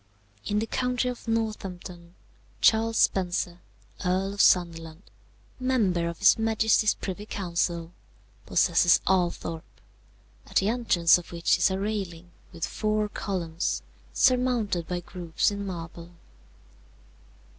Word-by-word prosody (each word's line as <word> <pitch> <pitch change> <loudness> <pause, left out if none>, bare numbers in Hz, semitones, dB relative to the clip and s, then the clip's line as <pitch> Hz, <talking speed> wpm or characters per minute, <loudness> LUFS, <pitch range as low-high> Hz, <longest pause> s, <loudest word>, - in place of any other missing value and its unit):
"In 205 - 0
the 215 - 0
county 250 +2 -1
of 245 -2 -8
Northampton, 185 -6 -4 0.4
Charles 225 0 +3
Spencer, 180 -2 +1 0.4
Earl 190 +2 0
of 205 - 0
Sunderland, 165 -1 +2 0.6
member 210 -10 +1
of 170 - -7
his 200 +2 +5
Majesty's 220 -1 +2
Privy 205 +2 -6
Council, 170 -3 -2 0.6
possesses 175 0 +4
Althorp, 175 -3 0 0.8
at - - -15
the 195 - +3
entrance 185 -8 +3
of 175 - -13
which 170 -1 +1
is - - +4
a 190 - -2
railing 190 -4 -4 0.2
with 170 -3 -3
four 215 -1 -1
columns 175 -4 -3 0.3
surmounted 245 -9 +1
by 180 -1 -3
groups 175 +1 -1
in 200 0 -5
marble. 170 -1 -7
190 Hz, 115 wpm, -26 LUFS, 170-215 Hz, 0.8 s, his